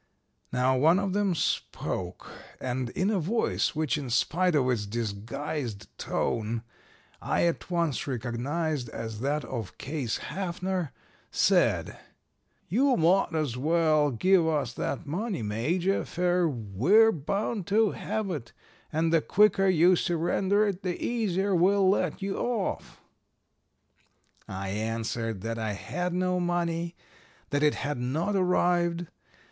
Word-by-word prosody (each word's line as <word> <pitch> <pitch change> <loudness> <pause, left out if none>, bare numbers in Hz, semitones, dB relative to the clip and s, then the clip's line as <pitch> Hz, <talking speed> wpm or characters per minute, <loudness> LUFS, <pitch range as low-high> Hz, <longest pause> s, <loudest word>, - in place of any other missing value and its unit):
"Now 125 +1 +2
one 160 +7 +5
of 195 -1 -1
them 200 -3 +1
spoke, 90 - -2 0.3
and 125 -1 -2
in 190 - 0
a 200 - +1
voice 195 0 0
which 150 -2 0
in 135 -3 -5
spite 160 +8 +2
of 135 -3 +3
its 115 -5 0
disguised 115 - -4
tone 115 +1 -1 0.6
I - - +1
at 170 +1 -1
once 170 -6 0
recognized 130 +3 -2
as 110 -1 -6
that 145 +4 -1
of 115 -6 -6
Case 135 -5 -3
Haffner 185 -3 -3 0.4
said, - - +2 0.7
'You 260 +8 +3
mought 170 +1 +3
as 145 -6 -1
well 155 +1 +3
give 170 - +3
us 145 -6 0
that - - -3
money, 180 - -3
Major, 160 - 0
fer 180 0 +1
we're 135 - +3
bound 195 - -2
to 215 +1 +3
have 215 -1 -3
it, 130 -9 -6 0.4
and 160 +1 +1
the 165 - +5
quicker 195 +1 +4
you 180 0 +5
surrender 190 +4 +1
it 195 -2 -3
the 180 -2 -3
easier 200 -4 0
we'll 190 +2 +4
let 195 +1 +1
you 195 0 -2
off.' 235 -5 -2 1.5
"I 95 0 -5
answered 115 0 -2
that 115 +2 -3
I 110 -2 -2
had 180 - -3
no 180 0 0
money; 170 -1 -1 0.6
that 145 -1 +1
it 150 -1 +3
had 145 -2 -3
not 155 +11 -1
arrived. 175 -2 +2
165 Hz, 130 wpm, -28 LUFS, 125-185 Hz, 1.5 s, one